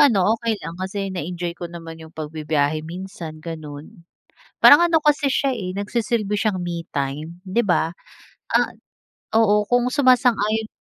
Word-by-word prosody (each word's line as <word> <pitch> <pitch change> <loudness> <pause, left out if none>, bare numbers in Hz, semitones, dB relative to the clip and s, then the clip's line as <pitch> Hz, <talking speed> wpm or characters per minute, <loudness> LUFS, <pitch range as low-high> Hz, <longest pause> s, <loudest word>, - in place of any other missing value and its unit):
ano 215 -8 +5
okey 230 -2 0
lang 165 -3 -7
kasi 195 0 -3
na-enjoy 175 0 -4
ko 175 0 -7
naman 165 -1 -9
iyong 160 0 -13
pagbibiyahe 155 -1 -1
minsan, 170 -1 -8
ganoon. 160 +3 -8 0.6
Parang 290 +4 +8
ano 335 -2 +4
kasi 295 -2 +2
siya, 270 0 +1
eh, 185 -6 -4
nagsisilbi 210 +1 -1
siyang 210 -3 0
me 175 -1 -3
time 145 +4 -4
'di 210 +6 +1
ba? 175 -4 +1 0.6
Ah - - +3 0.6
oo 210 -2 +4
kung 245 0 +2
sumasang-ayon 245 -5 +3
185 Hz, 145 wpm, -22 LUFS, 165-225 Hz, 0.6 s, Parang